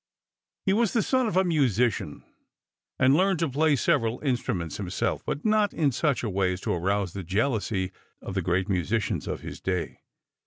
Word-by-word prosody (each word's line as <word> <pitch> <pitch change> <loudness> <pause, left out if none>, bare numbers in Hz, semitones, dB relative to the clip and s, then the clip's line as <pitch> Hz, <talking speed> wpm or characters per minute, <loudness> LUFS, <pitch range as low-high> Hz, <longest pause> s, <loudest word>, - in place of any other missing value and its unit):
He 195 - +3
was 225 0 +2
the 230 - +2
son 260 -2 +2
of 205 - -1
a 190 - +5
musician 125 - +1 0.7
and 130 +2 +5
learned 190 +2 +3
to 165 - 0
play 150 +2 +2
several 120 -3 +1
instruments 95 - -2
himself, - - -2
but 145 - -3
not 215 -1 +2
in 150 -4 +2
such 140 +1 0
a 115 - -1
way 95 -1 +1
as 90 - -7
to - - -1
arouse 95 +1 -1
the 100 - -4
jealousy 100 -1 -1 0.3
of - - -7
the 95 - 0
great 90 +2 0
musicians 100 +4 -1
of - - -4
his - - -8
day. 90 -2 -2
120 Hz, 185 wpm, -26 LUFS, 95-160 Hz, 0.7 s, a